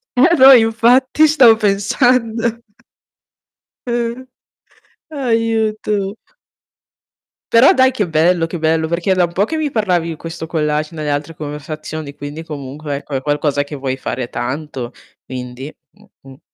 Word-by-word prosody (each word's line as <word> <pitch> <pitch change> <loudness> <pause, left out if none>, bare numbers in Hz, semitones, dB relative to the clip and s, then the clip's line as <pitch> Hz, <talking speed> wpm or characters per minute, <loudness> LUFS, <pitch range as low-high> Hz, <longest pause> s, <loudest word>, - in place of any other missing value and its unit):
Eh, 330 +8 +4
no 265 0 +9
infatti 245 +5 +4
stavo 260 -7 +6
pensando. 225 +2 +1 1.3
Eh. 240 +1 -2 0.8
Aiuto. 220 -6 -1 1.4
Però 230 +4 +7
dai 260 0 +4
che 220 -7 -2
bello, 165 +2 +2
che 165 +1 -6
bello 160 0 +1
perché 170 +3 -2
è - - +3
da 185 - +3
un 170 - -1
po' 190 - +2
che 320 +8 -4
mi 305 -2 -2
parlavi 180 -7 0
di 165 - -4
questo 165 0 -7
collage 155 -1 -2
nelle 155 -2 -4
altre 145 +3 -3
conversazioni, 150 0 -7
quindi 145 +3 -7
comunque 145 -1 -6
ecco 140 0 -7
è 130 - -1
qualcosa 145 -1 0
che 145 - -11
vuoi 135 -1 -3
fare 125 -2 -4
tanto, 130 0 -5 0.3
quindi 130 +2 -8 0.5
mh-mh. 135 0 -15
170 Hz, 140 wpm, -17 LUFS, 150-230 Hz, 1.4 s, no